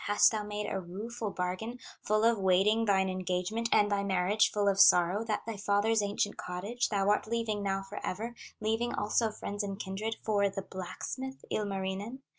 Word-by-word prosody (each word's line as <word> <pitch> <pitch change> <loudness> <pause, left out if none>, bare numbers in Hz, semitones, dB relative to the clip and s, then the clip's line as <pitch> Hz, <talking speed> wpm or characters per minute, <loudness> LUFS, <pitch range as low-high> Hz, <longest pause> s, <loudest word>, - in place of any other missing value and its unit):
Hast 205 0 +5
thou 215 -2 -1
made 210 0 -4
a 195 - -2
rueful 210 +5 -5
bargain, 185 +6 -3 0.2
Full 215 +1 +1
of 230 -1 +4
wailing 195 +4 +3
thine 190 -2 +3
engagement, 185 +5 -2
And 205 0 +4
thy 200 0 +1
marriage 195 +2 +2
full 205 -1 0
of 195 -1 +2
sorrow, 180 +3 +6
That 220 -2 -2
thy 225 -2 -5
father's 205 +2 +2
ancient 205 0 -1
cottage 200 +7 -2
Thou 200 -2 0
art 210 - +1
leaving 225 -2 -1
now 195 -1 -1
forever, 205 +3 -5 0.3
Leaving 225 +2 0
also 220 +2 +1
friends 205 -1 -5
and 200 -1 -4
kindred, 210 +4 -3
For 205 -2 +2
the 195 0 -5
blacksmith, 260 +9 -6
Ilmarinen? 200 +5 -3
205 Hz, 175 wpm, -31 LUFS, 195-220 Hz, 0.3 s, sorrow